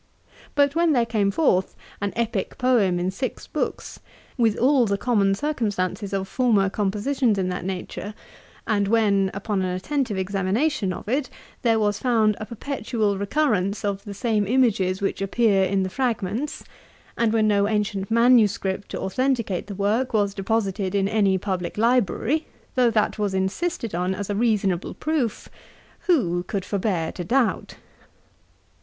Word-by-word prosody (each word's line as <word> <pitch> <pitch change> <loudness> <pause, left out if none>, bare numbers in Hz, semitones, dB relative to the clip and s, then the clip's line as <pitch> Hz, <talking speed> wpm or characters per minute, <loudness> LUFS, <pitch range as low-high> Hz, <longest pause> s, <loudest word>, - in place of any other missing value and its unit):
But 285 -1 +3
when 335 -1 +3
there 240 -3 +3
came 215 -4 +1
forth 195 - +1 0.3
an 205 -1 -1
Epick 225 -4 -2
Poem 235 -9 +2
in 180 +1 -1
six 255 +7 -4
books, - - -4 0.4
with 225 -4 +2
all 255 -1 +4
the 200 0 0
common 200 -4 +2
circumstances 205 - -2
of 195 -1 -2
former 210 -5 +2
compositions 215 +4 0
of 185 -1 0
that 180 -1 -4
nature; 190 +2 -5 0.5
and 205 -2 +1
when, 200 -3 +3
upon 200 0 -2
an 185 - 0
attentive 215 +4 -2
examination 195 +5 0
of 180 - -7
it, 260 +4 0 0.3
there 230 -2 +3
was 205 -1 0
found 220 -4 +2
a 215 - -6
perpetual 225 -5 -2
recurrence 205 -4 0
of 200 -1 -2
the 205 -1 -8
same 215 -2 0
images 200 -6 +2
which 195 - -1
appear 195 -1 +2
in 190 +1 +1
the - - -1
fragments; 235 +4 -2 0.5
and 230 -2 +1
when 220 -1 +2
no 200 -1 +3
ancient 205 -2 -1
manuscript, 225 -5 +3
to - - -5
authenticate 230 -3 -1
the 205 - -6
work, 215 +6 0
was 200 -2 +2
deposited 195 -1 -1
in 195 -1 +2
any 200 -2 +2
publick 185 -1 -3
library, 245 - +1 0.3
though 250 -2 +4
that 220 -1 0
was 205 -2 0
insisted 230 - -2
on 180 +2 -1
as 205 +1 -4
a - - -1
reasonable 200 -5 0
proof, 300 -8 -2 0.6
who 180 - +2
could 190 +1 -4
forbear 185 -5 -1
to 180 - -6
doubt? 240 +6 0
210 Hz, 155 wpm, -24 LUFS, 195-240 Hz, 0.6 s, all